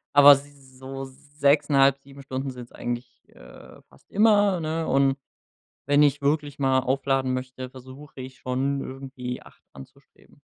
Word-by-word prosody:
Aber 145 0 +10
s 140 -2 -8
so 135 +1 -7
6,5, 140 0 +2
7 140 0 -14
Stunden 135 0 -4
sind's 125 -1 -11
eigentlich, 120 +1 -6
äh, - - -15
fast - - -24
immer, 205 -3 +4
ne? 160 +1 -2
Und 135 0 +3 0.7
wenn 145 +1 +4
ich 145 0 +2
wirklich 145 0 -1
mal 135 -1 +2
aufladen 135 0 0
möchte, 130 0 -5
versuche 130 +2 -12
ich 130 0 -10
schon, 135 +2 -1
irgendwie 130 -2 -7
8 - - -19
anzustreben. 65 -1 -17
135 Hz, 140 wpm, -25 LUFS, 130-145 Hz, 0.7 s, Aber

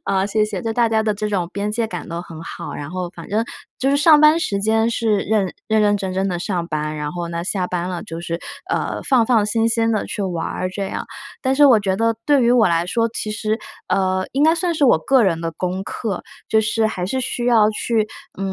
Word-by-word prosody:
啊， 195 -1 +1
谢 210 +1 +1
谢！ 210 -3 -4
这 225 -1 -1
大 235 0 +2
家 220 -1 +2
的 215 -1 +1
这 210 +1 -3
种 180 -4 -1
边 205 +1 -2
界 225 0 -1
感 - - -6
都 170 +1 -4
很 165 -3 -10
好， 170 - -7
然 145 - -6
后 180 -1 -4
反 170 -2 -11
正 220 +3 0 0.4
就 270 +1 +2
是 280 - +3
上 300 0 +6
班 305 +2 +6
时 200 - -1
间 220 +2 +2
是 220 -3 +1
认 200 -2 0
认 220 -1 +2
认 205 0 +3
真 190 -2 -4
真 195 +1 0
地 175 - -2
上 175 -2 -2
班， 155 0 -2
然 150 0 -3
后 175 0 -4
呢 170 0 -4
下 185 -1 -1
班 180 0 -2
了 180 -2 -4
就 165 +1 -7
是， 170 -1 -3 0.3
呃， - - -1
放 245 -4 +3
放 225 -4 +3
心 225 +2 +1
心 225 0 +1
地 215 - 0
去 205 - -4
玩 175 -3 -2
儿 185 0 -3
这 195 +1 -3
样。 - - -4 0.4
但 260 - +1
是 290 -1 +7
我 235 -6 +6
觉 190 -1 0
得 230 0 +2
对 285 -3 +4
于 235 - +4
我 230 -6 +5
来 170 +1 +1
说， 230 +4 +1
其 215 -1 -4
实 215 +1 -1 0.3
呃， 185 0 +1
应 275 - -2
该 320 +1 +5
算 345 0 0
是 310 -3 +1
我 245 - +6
个 255 +6 +3
人 165 -3 +1
的 165 - -2
功 185 +3 -3
课， 200 -2 -4 0.3
就 220 - +4
是 220 +1 +1
还 185 -5 -3
是 260 +6 -1
需 240 0 -3
要 220 -3 +5
去， 215 0 0 0.3
嗯， 195 0 -2
210 Hz, 270 characters per minute, -20 LUFS, 180-230 Hz, 0.4 s, 是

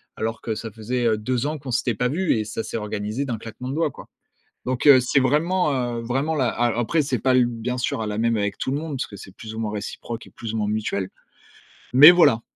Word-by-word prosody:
alors 115 +1 -3
que 115 - -2
ça 110 +1 -6
faisait, 120 +3 -3
heu, 110 -1 +2
2 125 +5 -1
ans 155 0 -3
qu'on 130 -2 -7
s'était 120 -1 0
pas 125 +3 0
vus, 175 +5 +1
et 110 - -2
ça 110 +1 -4
s'est 115 - -5
organisé 105 +4 -3
d'un 120 -4 -3
claquement 115 +3 -8
de - - -3
doigts 160 -1 +1
quoi. - - -13 0.6
Donc, 130 +3 -1
heu, 130 -3 +9
c'est 125 +3 +2
vraiment, 145 -3 +1
heu, - - -5
vraiment 135 +7 -1
la 130 -4 +1
a 120 0 0
après 155 +7 +1
c'est 135 -5 -1
pas 130 +2 +2
l 125 -1 +5
bien 120 +1 -4
sûr, 125 -2 -2
hein, 110 - -2
la 105 0 -3
même 115 0 +1
avec 100 -1 -2
tout 130 - -2
le 140 - 0
monde 155 -3 -5
parce - - -3
que 100 - -11
c'est 95 0 -12
plus 110 -1 -9
ou - - -5
moins 105 -1 -3
réciproque 110 +2 -6
et - - -17
plus 115 -2 -7
ou 115 - -2
moins 105 -1 -1
mutuel. 100 -3 -2 0.8
Mais 145 +6 +11
voilà, 165 -10 +4
120 Hz, 265 wpm, -23 LUFS, 110-135 Hz, 0.8 s, Mais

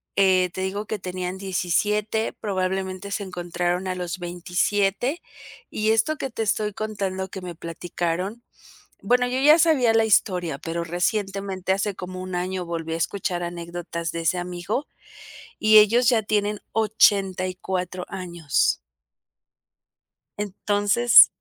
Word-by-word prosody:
eh 185 -2 +4
te 185 - -4
digo 195 +3 -3
que 215 0 -4
tenían 185 0 -4
17, 205 +4 0
probablemente 190 -1 -3
se 200 - -2
encontraron 175 0 -2
a 185 - -2
los 180 0 -4
27, 195 - -1 0.5
y 215 0 0
esto 225 +8 +2
que 270 - -3
te 225 -2 -3
estoy 210 0 0
contando 195 -3 -3
que 190 - -7
me 180 -2 -7
platicaron, 175 +5 -4 0.6
bueno, 245 +5 +3
yo 255 +1 -1
ya 300 +4 +7
sabía 295 -9 +4
la 225 0 +4
historia, 180 -7 +2
pero 165 +2 -4
recientemente 190 +2 -2
hace 195 +1 0
como 185 0 -7
1 185 -1 -5
año 180 0 -2
volví 165 -1 -4
a - - -1
escuchar 175 +1 -2
anécdotas 170 -1 -5
de 170 - -4
ese 165 +2 +1
amigo, 180 +9 -3 0.7
y 215 0 +5
ellos 230 +3 +5
ya 230 -3 +4
tienen 210 0 0
84 185 -4 +1
años. 175 -6 0 1.6
Entonces 205 +3 +5
190 Hz, 130 wpm, -24 LUFS, 180-210 Hz, 1.6 s, ya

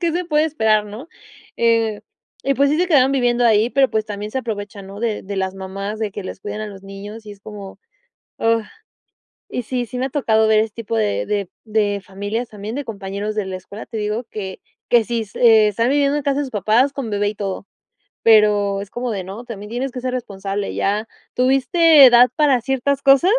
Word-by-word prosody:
qué 340 -2 0
se 355 +1 -1
puede 305 -2 +2
esperar 220 -9 +1
¿no? 225 +10 -9 0.5
Eh, 230 -2 +1 0.4
y 275 0 +2
pues 280 +1 +3
sí 305 - +1
se 360 - +2
quedaron 275 -6 +4
viviendo 245 -2 +2
ahí, 220 0 +4
pero 265 0 +2
pues 215 -1 0
también 210 0 -5
se 265 - -2
aprovechan 205 -4 -6
¿no? 200 +1 -9
De 225 -2 -1
de 200 0 -5
las 190 0 -2
mamás, 195 +3 -5
de 215 -2 -2
que 205 - -6
les 185 - -7
cuiden 210 +1 -5
a 215 - -4
los 195 -2 -10
niños 205 +3 -9
y 210 - -8
es 200 - -16
como, 200 -2 -10 0.6
ah, 225 -1 +1 0.8
y 250 - -3
sí 245 +1 -3
sí 250 +3 -6
me 260 - 0
ha - - -6
tocado 220 -6 +2
ver 220 0 +4
este 220 -1 -2
tipo 200 - -4
de 105 -1 0
de 200 -3 -1 0.2
de 210 -2 0
familias 205 +5 -4
también 210 +2 -7
de 285 0 -3
compañeros 205 -1 -5
de 210 -3 -2
la 190 -1 -4
escuela 200 +3 -10
te 225 - -8
digo 215 +3 -2
que 190 -3 -6 0.3
que 235 -2 +4
sí 235 0 -2
est 205 - -13
están 225 -1 +4
viviendo 285 +1 +2
en - - -4
casa 280 0 0
sus 270 - -6
papás 225 +6 +2
con 265 -6 -5
bebé 205 0 0
y 210 - -4
todo 200 -1 -5 0.6
pero 210 -3 +4
es 200 - -8
como 245 -1 -3
de 195 -3 -3
no 205 +6 -8
también 210 -3 -8
tienes 250 +3 -3
que 250 - -5
ser 255 0 -3
responsable 200 -4 -4
ya. 210 +3 0 0.3
¿Tuviste 270 +5 +5
edad 245 0 +7
para 285 -5 +3
ciertas 270 +2 0
cosas? 275 +7 +5
220 Hz, 220 wpm, -20 LUFS, 205-255 Hz, 0.8 s, edad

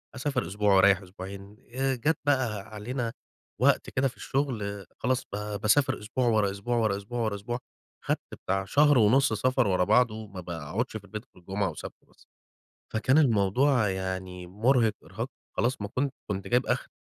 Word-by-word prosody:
أسافر 135 - -1
أسبوع 100 +2 +2
وأريح 95 +1 +6
أسبوعين. 100 +2 -9 0.2
آآ، 135 0 +1
جات 145 +6 +1
بقي 130 -7 +1
علينا 115 +4 -4 0.5
وقت - - +3
كده 135 0 +1
في 130 - -8
الشغل، 105 -8 -2
خلاص 130 +2 0
ب 105 0 -3
باسافر 130 +7 +3
أسبوع، 120 +4 -1
ورا 105 -4 +3
أسبوع، 110 +5 -2
ورا 110 -4 +2
أسبوع، 105 +5 -5
ورا 110 -2 0
أسبوع، 120 +5 -4 0.5
خدت - - +1 0.3
بتاع 95 +1 0
شهر 145 +4 +5
ونص 120 +3 +4
سفر 125 +1 +2
ورا 90 -1 +2
بعضه، 110 +1 +2
ما 95 -2 -8
باقعدش 85 - -3
في 100 - -13
البيت 105 +3 -7
غير 90 - -18
جمعة 95 +1 -1
وسبت 80 - -9
بس. - - -24 0.7
فكان 125 +6 +3
الموضوع 120 -1 +3
يعني 95 -1 -4
مرهق 115 +4 +2
إرهاق، 115 +6 -5 0.3
خلاص 125 0 0
ما 100 - -3
كُن 135 +5 -1 0.2
كُنت 95 -1 -3
جايب 125 +1 +2
آخري. - - -1
105 Hz, 170 wpm, -28 LUFS, 100-125 Hz, 0.7 s, وأريح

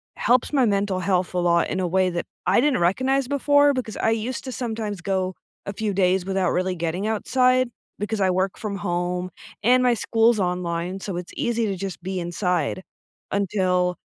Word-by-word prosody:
helps 250 +4 +2
my 270 -3 +4
mental 200 -3 0
health 185 -1 0
a 180 - 0
lot 170 -1 +2
in 190 - -2
a 185 - 0
way 185 +1 +2
that 175 -1 -3 0.2
I - - +4
didn't 285 -1 +2
recognize 260 +10 +1
before, 285 +1 +4
because 250 -5 -4
I 225 - +1
used 225 +3 -2
to 260 - -4
sometimes 220 -6 -4
go 185 0 -1 0.3
a 200 - -4
few 210 0 -2
days 185 -1 +2
without 190 -2 0
really 185 +1 0
getting 170 +3 -2
outside, 255 +3 +2 0.3
because 210 +1 -2
I 190 - +3
work 185 +1 0
from 205 -2 -4
home, 180 -1 -2 0.3
and 250 +3 +5
my 250 -1 +4
school's 225 0 +2
online, 180 0 -2
so 190 -3 -4
it's 175 -1 -7
easy 235 -1 0
to 195 - -2
just 190 -1 -6
be 190 +2 -4
inside, 180 +1 -1 0.5
until 185 -2 +1
195 Hz, 185 wpm, -23 LUFS, 180-230 Hz, 0.5 s, and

